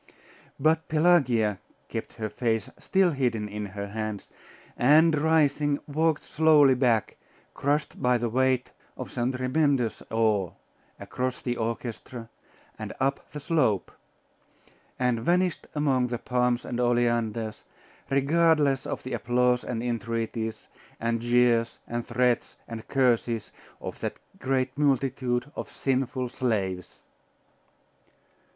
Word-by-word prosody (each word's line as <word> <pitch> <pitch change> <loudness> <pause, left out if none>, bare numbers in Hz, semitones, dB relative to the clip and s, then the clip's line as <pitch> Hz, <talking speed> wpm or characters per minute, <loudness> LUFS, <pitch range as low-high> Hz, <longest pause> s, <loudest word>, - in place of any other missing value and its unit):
But 160 +1 +2
Pelagia 135 - +3 0.3
kept - - -6
her 110 - -3
face 115 +2 -1
still 190 -2 +2
hidden 120 -7 -1
in 105 0 -5
her 100 +1 -6
hands, 110 -1 -5 0.4
and 155 +5 +5
rising, 150 -2 +2
walked 155 +1 0
slowly 150 -3 +5
back, 120 -4 +1 0.4
crushed 145 +2 -1
by 125 0 +3
the 120 0 -1
weight 130 +1 +1 0.3
of - - -6
some 120 +1 -1
tremendous 130 -1 0
awe, 110 -5 +1 0.5
across 130 0 -3
the 120 -1 -2
orchestra, 115 0 -5 0.5
and - - -5
up 135 +1 -1
the 150 - -6
slope; 135 - +1 1.1
and 125 -2 +1
vanished 175 +7 +1
among 135 -4 +2
the 120 -1 -3
palms 125 0 0
and 120 - -4
oleanders, 120 -3 0 0.5
regardless 145 0 +3
of - - -4
the 130 - -5
applause 125 +1 +1
and 115 -1 -3
entreaties, 115 -1 -3 0.3
and 115 0 -1
jeers, 120 -1 +2
and 120 0 -4
threats, 125 0 0
and 115 -1 -8
curses, 120 -4 +1 0.3
of - - -7
that - - -4 0.2
great 130 0 0
multitude 135 -2 0
of - - -5
sinful 130 -1 -1
slaves. 95 -8 -2
125 Hz, 120 wpm, -27 LUFS, 115-140 Hz, 1.1 s, and